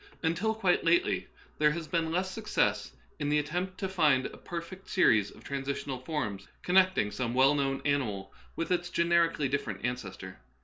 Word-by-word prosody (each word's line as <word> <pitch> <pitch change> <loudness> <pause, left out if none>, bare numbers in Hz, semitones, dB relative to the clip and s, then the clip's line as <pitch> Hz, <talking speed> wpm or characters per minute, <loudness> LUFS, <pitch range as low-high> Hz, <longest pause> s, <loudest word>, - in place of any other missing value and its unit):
Until 180 +7 +1
quite 190 -5 +2
lately 170 0 +2 0.3
there 150 0 +5
has 165 -1 -5
been 165 -2 0
less 185 +2 -1
success 215 +2 0 0.3
in 145 -1 -1
the 150 - +3
attempt 180 +5 -2
to 190 - -2
find 155 -8 +3
a - - -6
perfect 175 +3 -8
series 110 - +4
of - - -16
transitional 140 -1 -4
forms 130 -8 -4 0.2
connecting 185 - +3
some 120 0 -3
well 135 +2 +5
known 135 -2 -1
animal 110 -10 -1 0.2
with 165 - -3
its 175 -1 0
generically 170 -4 +2
different 115 -7 -3
ancestor. 95 - -5
150 Hz, 165 wpm, -30 LUFS, 130-175 Hz, 0.3 s, there